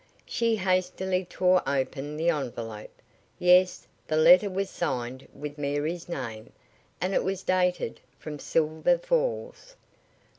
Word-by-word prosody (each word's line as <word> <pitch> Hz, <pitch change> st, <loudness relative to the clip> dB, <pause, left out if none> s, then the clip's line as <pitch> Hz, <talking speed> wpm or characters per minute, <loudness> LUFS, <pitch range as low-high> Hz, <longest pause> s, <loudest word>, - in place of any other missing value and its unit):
She 230 Hz, -1 st, +1 dB
hastily 185 Hz, -1 st, 0 dB
tore 180 Hz, +1 st, +3 dB
open 140 Hz, +2 st, -2 dB
the 165 Hz, +2 st, +2 dB
envelope. 115 Hz, -7 st, -6 dB, 0.3 s
Yes, 180 Hz, +1 st, +4 dB, 0.2 s
the 155 Hz, -, 0 dB
letter 180 Hz, +6 st, +7 dB
was 195 Hz, +1 st, -2 dB
signed 130 Hz, -4 st, -3 dB
with 150 Hz, +1 st, -8 dB
Mary's 150 Hz, +5 st, -2 dB
name, 115 Hz, -9 st, -6 dB, 0.5 s
and 185 Hz, +2 st, -1 dB
it -, -, +2 dB
was 190 Hz, 0 st, -2 dB
dated 180 Hz, -8 st, 0 dB, 0.2 s
from 150 Hz, -1 st, -7 dB
Silver 160 Hz, -, +1 dB
Falls. -, -, -2 dB
175 Hz, 120 wpm, -27 LUFS, 145-185 Hz, 0.5 s, letter